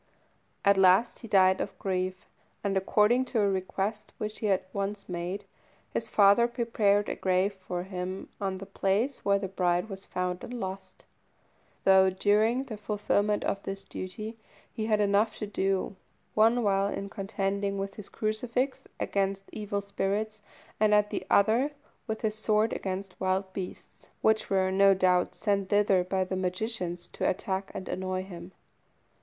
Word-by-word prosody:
At 200 -1 +5
last 190 +5 +5
he 230 - -9
died 190 -2 +4
of 195 - -5
grief; 185 -1 -2 0.4
and 200 -1 0
according 210 +6 +3
to 245 -2 -1
a 205 - +3
request 195 +2 -2
which 215 0 -4
he 215 - -1
had 190 -2 +2
once 200 0 -3
made, 180 +2 -4 0.5
his - - -2
father 205 +3 +5
prepared 220 -4 +1
a - - -1
grave 185 +2 +1
for 180 -2 -5
him 185 0 -5
on 190 -1 -1
the 195 - -8
place 200 +7 0
where 200 0 +3
the 195 -1 -3
bride 180 +1 0
was 195 -1 -7
found 180 0 -2
and 245 - -6
lost, 190 -3 -6 0.8
though 190 0 +6
during 210 +6 +2
the 230 -6 -7
fulfilment 210 0 0
of 195 - -1
this 195 0 -5
duty 215 +5 -6 0.3
he 220 -1 -3
had 215 -2 +2
enough 205 +2 +2
to - - -3
do 195 -1 -1 0.4
one 230 +3 +4
while 195 -1 +2
in 200 0 -4
contending 200 0 -2
with 195 0 -3
his 205 -1 -9
crucifix 235 +5 -1 0.2
against 195 0 -1
evil 205 -1 -3
spirits, 205 +2 -2 0.4
and 210 0 +5
at 210 0 +2
another, 230 +8 +2 0.3
with 220 -1 -3
his 220 -2 0
sword 215 0 +1
against 190 0 -4
wild 190 0 0
beasts, 185 -1 -8 0.2
which 220 0 +3
were 190 -1 +2
no 195 0 +5
doubt 180 -1 +2
sent 200 -3 0
thither 205 -3 +4
by 190 +1 0
the 185 0 -3
magicians 185 -2 -3
to - - -1
attack 190 +1 -2
and 185 - -5
annoy 185 0 -2
him. 175 -1 -9
200 Hz, 160 wpm, -29 LUFS, 190-215 Hz, 0.8 s, though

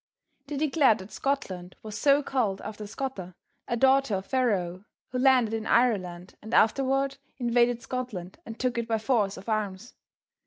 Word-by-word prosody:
They 295 - -4
declared 280 -6 +3
that 190 0 -11
Scotland 185 -10 -3
was 215 -1 -7
so 280 +6 +4
called 225 -8 0
after 210 0 -7
Scota, 205 -6 -5 0.3
a 235 - -1
daughter 265 -3 +4
of 190 0 -4
Pharaoh, 195 -8 0 0.2
who 255 - -3
landed 255 -4 +4
in 225 -1 -3
Ireland 185 -7 +1
and 220 +2 -3
afterward 270 +4 +2 0.2
invaded 240 -1 +2
Scotland 240 - -5
and 225 -6 -9
took 250 -2 0
it 230 - -3
by 225 -2 +1
force 215 -3 +1
of 190 - -11
arms. 215 0 -2
230 Hz, 160 wpm, -27 LUFS, 200-260 Hz, 0.3 s, so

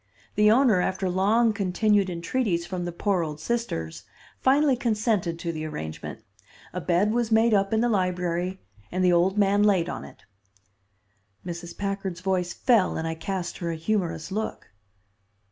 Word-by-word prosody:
The 210 0 +4
owner, 225 -5 +4
after 190 +1 -1
long 215 +5 +3
continued 200 0 +1
entreaties 170 +1 -1
from 180 -1 -4
the 175 - -3
poor 185 +1 0
old 150 -2 -5
sisters, 155 - -3 0.4
finally 275 +1 +4
consented 215 -7 0
to 170 0 -3
the 155 -1 -5
arrangement. 80 - -6 0.5
A - - -3
bed 185 +4 +2
was 235 0 0
made 225 +1 +4
up 195 -1 +2
in 220 0 +2
the 240 - +2
library, 180 -3 -1 0.3
and 185 +1 +1
the 180 - +5
old 180 +4 +2
man 200 0 +3
laid 190 -5 +3
on - - -5
it." - - -14 1.2
Mrs. 170 -1 -7
Packard's 195 -3 -3
voice 185 -2 0
fell, 225 -4 +2
and 160 - -2
I 165 - -2
cast 175 +2 -4
her 170 - -3
a 165 - -2
humorous 170 0 -2
look. 215 - -4
190 Hz, 160 wpm, -26 LUFS, 175-215 Hz, 1.2 s, the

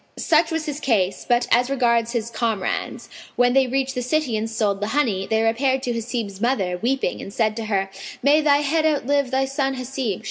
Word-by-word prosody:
Such 320 0 +3
was 320 -1 -2
his 295 -2 -4
case; 205 -10 0
but 240 0 +2
as 245 +2 +3
regards 235 -3 +1
his 235 -1 -2
comrades, 225 -5 -2 0.3
when 245 0 +3
they 265 -1 +4
reached 265 +1 -1
the 250 - -3
city 255 -1 0
and 220 +1 -2
sold 210 -3 -1
the 205 - -1
honey, 205 -10 +1
they 220 0 +1
repaired 260 +4 +1
to 245 - -1
Hasib's 225 -4 -4
mother, 195 -8 0
weeping, 255 -3 -1
and - - -8
said 215 0 0
to 225 - -3
her, 195 -2 0 0.4
"May 290 +3 +5
thy 290 -1 +3
head 310 +2 +1
outlive 285 -3 +1
thy 265 +1 +1
son 270 0 -1
Hasib!" 255 -5 -3
245 Hz, 205 wpm, -22 LUFS, 220-270 Hz, 0.4 s, May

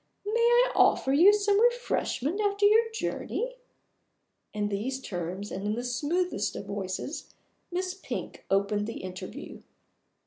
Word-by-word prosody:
May 435 +3 0
I 480 +1 +5
offer 265 - +4
you 345 +8 +8
some 410 0 +2
refreshment 440 - +1
after 405 0 +2
your 450 +2 +5
journey?" - - -3 0.9
In 210 -1 -2
these 230 +7 -2
terms 185 -2 -5
and 195 - -4
in 210 +1 0
the 240 - -3
smoothest 290 - -1
of - - -6
voices, 200 - -5 0.4
Miss 365 +1 -2
Pink 380 - -6
opened 200 +2 +1
the 230 - -6
interview. 185 0 -8
285 Hz, 135 wpm, -28 LUFS, -, 0.9 s, you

